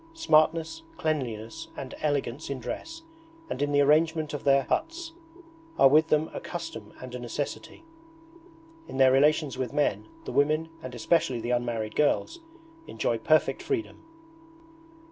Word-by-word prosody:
Smartness, 165 Hz, -, +2 dB, 0.2 s
cleanliness 145 Hz, 0 st, -3 dB
and 135 Hz, -2 st, -6 dB
elegance 145 Hz, -2 st, -1 dB
in 140 Hz, -2 st, -3 dB
dress 325 Hz, -, -6 dB, 0.5 s
and -, -, -3 dB
in 145 Hz, 0 st, +1 dB
the 145 Hz, 0 st, +4 dB
arrangement 155 Hz, +1 st, +3 dB
of 145 Hz, -, -5 dB
their 140 Hz, 0 st, +5 dB
huts, 330 Hz, -, -2 dB, 0.6 s
are 135 Hz, -, +7 dB
with 155 Hz, +3 st, +5 dB
them 155 Hz, 0 st, +1 dB
a -, -, -4 dB
custom -, -, -7 dB
and 130 Hz, -1 st, -9 dB
a 125 Hz, -, -5 dB
necessity. 140 Hz, -, -5 dB, 1.0 s
In -, -, -7 dB
their 130 Hz, -1 st, +6 dB
relations 145 Hz, 0 st, +3 dB
with 130 Hz, -3 st, -3 dB
men 145 Hz, -, 0 dB, 0.2 s
the -, -, -5 dB
women, 155 Hz, +3 st, +2 dB
and 125 Hz, -1 st, -7 dB
especially 130 Hz, +1 st, +1 dB
the 120 Hz, +2 st, -3 dB
unmarried 120 Hz, -3 st, -1 dB
girls, 330 Hz, -, +1 dB, 0.5 s
enjoy -, -, -1 dB
perfect -, -, +2 dB
freedom. 385 Hz, -6 st, -3 dB
145 Hz, 145 wpm, -27 LUFS, 130-160 Hz, 1.0 s, are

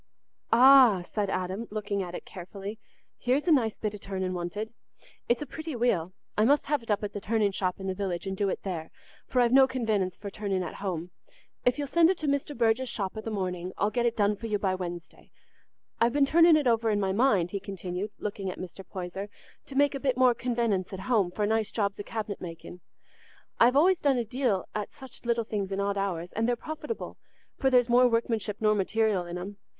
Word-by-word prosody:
"Ah," 250 Hz, -6 st, +7 dB
said 205 Hz, +2 st, -2 dB
Adam, 190 Hz, +4 st, -3 dB
looking 205 Hz, -1 st, -2 dB
at 180 Hz, -1 st, -5 dB
it -, -, -7 dB
carefully, 195 Hz, +4 st, -8 dB, 0.4 s
"here's 260 Hz, +6 st, +1 dB
a -, -, +5 dB
nice 235 Hz, -8 st, +3 dB
bit 215 Hz, -1 st, -3 dB
o' 210 Hz, -, -8 dB
turning 190 Hz, -2 st, -3 dB
wanted. 185 Hz, +6 st, -4 dB, 0.6 s
It's 240 Hz, +4 st, +2 dB
a -, -, -7 dB
pretty 315 Hz, -1 st, -6 dB
wheel. 195 Hz, -8 st, +1 dB, 0.2 s
I 210 Hz, -, +3 dB
must 285 Hz, +6 st, +4 dB
have 295 Hz, -1 st, 0 dB
it 230 Hz, -, -16 dB
up 210 Hz, 0 st, +1 dB
at 205 Hz, -, -4 dB
the 205 Hz, -, -5 dB
turning 210 Hz, -1 st, +1 dB
shop 185 Hz, -1 st, -2 dB
in 190 Hz, -, -6 dB
the 190 Hz, -, -1 dB
village 185 Hz, -2 st, -3 dB
and 190 Hz, 0 st, -3 dB
do 200 Hz, 0 st, 0 dB
it -, -, -4 dB
there, 170 Hz, -5 st, -4 dB, 0.4 s
for 255 Hz, -, 0 dB
I've 240 Hz, -1 st, +3 dB
no 265 Hz, 0 st, +7 dB
convenence 215 Hz, -8 st, -1 dB
for 200 Hz, -1 st, -7 dB
turning 195 Hz, -3 st, -2 dB
at -, -, -5 dB
home. 180 Hz, -3 st, -3 dB, 0.5 s
If 250 Hz, 0 st, +3 dB
you'll 290 Hz, -, -2 dB
send 330 Hz, +4 st, +4 dB
it 380 Hz, -, +1 dB
to 310 Hz, -, -3 dB
Mr. 280 Hz, 0 st, -1 dB
Burge's 235 Hz, +2 st, +2 dB
shop 195 Hz, -3 st, -2 dB
i' 220 Hz, -, -4 dB
the 225 Hz, -, -5 dB
morning, 185 Hz, -3 st, -3 dB
I'll 205 Hz, +1 st, +1 dB
get 240 Hz, 0 st, +1 dB
it 235 Hz, -, -2 dB
done 205 Hz, 0 st, +3 dB
for 225 Hz, +3 st, -6 dB
you 210 Hz, -2 st, 0 dB
by 195 Hz, -2 st, 0 dB
Wednesday. 175 Hz, -2 st, -7 dB, 0.7 s
I've 235 Hz, +1 st, +3 dB
been 285 Hz, -1 st, +4 dB
turning 330 Hz, +3 st, +6 dB
it 300 Hz, -, 0 dB
over 230 Hz, -2 st, +2 dB
in 210 Hz, -1 st, +1 dB
my 195 Hz, -1 st, 0 dB
mind," 200 Hz, -5 st, +2 dB
he 200 Hz, -, -2 dB
continued, 190 Hz, +1 st, -5 dB
looking 200 Hz, -2 st, -4 dB
at 180 Hz, -, -6 dB
Mr. 185 Hz, +1 st, -8 dB
Poyser, 185 Hz, +2 st, -6 dB, 0.4 s
"to 275 Hz, -, -9 dB
make 285 Hz, +1 st, +4 dB
a 275 Hz, -, -3 dB
bit 260 Hz, -2 st, 0 dB
more 255 Hz, -1 st, +5 dB
convenence 230 Hz, -6 st, -1 dB
at 190 Hz, -, -5 dB
home 210 Hz, -4 st, +2 dB
for 205 Hz, +4 st, -1 dB
nice 220 Hz, 0 st, 0 dB
jobs 200 Hz, -2 st, -1 dB
o' -, -, -3 dB
cabinet 215 Hz, -2 st, -5 dB
making. 175 Hz, +1 st, -9 dB, 0.8 s
I've 245 Hz, +2 st, +5 dB
always 350 Hz, +5 st, +5 dB
done 280 Hz, -3 st, +2 dB
a 240 Hz, -, -1 dB
deal 235 Hz, -5 st, 0 dB
at 210 Hz, -1 st, -4 dB
such 265 Hz, -3 st, -12 dB
little 235 Hz, -1 st, +1 dB
things 205 Hz, -3 st, -3 dB
in 195 Hz, -, -2 dB
odd 200 Hz, 0 st, 0 dB
hours, 180 Hz, -3 st, -2 dB
and 225 Hz, +1 st, 0 dB
they're 245 Hz, -, +2 dB
profitable, 315 Hz, -, -6 dB, 0.4 s
for 265 Hz, -, +3 dB
there's 250 Hz, -2 st, +4 dB
more 250 Hz, +1 st, +5 dB
workmanship 225 Hz, -3 st, 0 dB
nor 215 Hz, -1 st, +3 dB
material 205 Hz, -2 st, +1 dB
in 175 Hz, +1 st, -5 dB
'em. 195 Hz, +3 st, -7 dB
210 Hz, 225 wpm, -28 LUFS, 190-245 Hz, 0.8 s, Ah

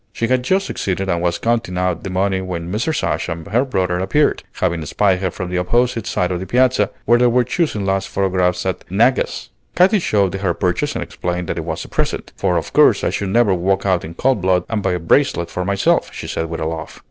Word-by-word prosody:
She 115 Hz, -, -2 dB
had 130 Hz, +2 st, +2 dB
just 190 Hz, +9 st, +1 dB
succeeded 95 Hz, -, -2 dB
and 85 Hz, -2 st, 0 dB
was 85 Hz, -1 st, 0 dB
counting 115 Hz, -5 st, -1 dB
out 90 Hz, -2 st, 0 dB
the 100 Hz, -, -4 dB
money 95 Hz, +1 st, 0 dB
when 90 Hz, -2 st, -5 dB
Mrs. 120 Hz, +10 st, -1 dB
Ashe -, -, -1 dB
and 80 Hz, -1 st, -5 dB
her 115 Hz, +5 st, +1 dB
brother 95 Hz, -9 st, -1 dB
appeared, 145 Hz, +11 st, +1 dB
having 85 Hz, -3 st, -1 dB
spied 95 Hz, +2 st, +2 dB
her 95 Hz, -1 st, -1 dB
from 90 Hz, +1 st, -6 dB
the 90 Hz, -, 0 dB
opposite 120 Hz, +4 st, 0 dB
side 90 Hz, 0 st, 0 dB
of 90 Hz, -, -2 dB
the 95 Hz, -, -6 dB
Piazza, 125 Hz, -4 st, +3 dB, 0.2 s
where 120 Hz, +1 st, +4 dB
they 125 Hz, -, +5 dB
were 125 Hz, +1 st, +3 dB
choosing 125 Hz, -, -1 dB
last 95 Hz, 0 st, 0 dB
photographs 90 Hz, -2 st, 0 dB
at 95 Hz, -, -2 dB
Naga's. 115 Hz, +7 st, +1 dB, 0.2 s
Katy 190 Hz, +4 st, +4 dB
showed 100 Hz, -, +1 dB
her 95 Hz, -3 st, -1 dB
purchase 90 Hz, -2 st, -1 dB
and -, -, -2 dB
explained 90 Hz, 0 st, -4 dB
that -, -, -2 dB
it -, -, -5 dB
was -, -, -4 dB
a -, -, -10 dB
present; -, -, -3 dB
"for -, -, 0 dB
of -, -, -4 dB
course -, -, +5 dB
I -, -, +1 dB
should 100 Hz, -, -2 dB
never 115 Hz, -1 st, +3 dB
walk 95 Hz, +2 st, 0 dB
out 95 Hz, -3 st, +1 dB
in 80 Hz, +1 st, -8 dB
cold 130 Hz, -3 st, +1 dB
blood 90 Hz, -1 st, +2 dB
and 110 Hz, -2 st, -1 dB
buy 90 Hz, -, 0 dB
a 90 Hz, -, -1 dB
bracelet 85 Hz, -, +1 dB
for 90 Hz, -, -2 dB
myself," 100 Hz, +1 st, +1 dB
she -, -, -7 dB
said 80 Hz, -, -3 dB
with 85 Hz, -1 st, -4 dB
a -, -, -1 dB
laugh. 80 Hz, 0 st, -5 dB
95 Hz, 240 wpm, -19 LUFS, 90-115 Hz, 0.2 s, they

